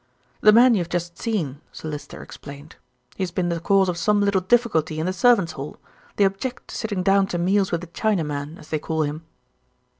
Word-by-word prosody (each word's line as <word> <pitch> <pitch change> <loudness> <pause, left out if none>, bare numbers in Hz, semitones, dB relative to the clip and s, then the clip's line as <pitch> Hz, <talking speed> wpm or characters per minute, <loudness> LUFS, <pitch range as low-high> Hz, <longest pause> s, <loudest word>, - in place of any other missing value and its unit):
"The 215 - +7
man 240 +3 +7
you 210 - +2
have 175 -1 -3
just 175 -1 -3
seen," 160 - -2
Sir - - -8
Lyster 150 -1 -7
explained. 145 +2 -11 0.4
"He - - -5
has 185 - 0
been 175 0 -1
the 170 -1 -1
cause 195 +3 +3
of 175 -1 -2
some 210 +3 +2
little 200 -2 +2
difficulty 185 -8 +1
in 160 - -1
the 185 - -1
servants' 200 -5 +3
hall. 140 0 -7 0.4
They 205 - +3
object 195 +6 -2
to - - -7
sitting 205 -5 -2
down 195 0 +3
to 175 - -3
meals 190 +3 +1
with 170 0 -1
a - - -8
Chinaman, 160 -6 -2
as 150 - -15
they 155 - -1
call 160 +1 -1
him. 150 +2 -4
180 Hz, 215 wpm, -23 LUFS, 160-200 Hz, 0.4 s, The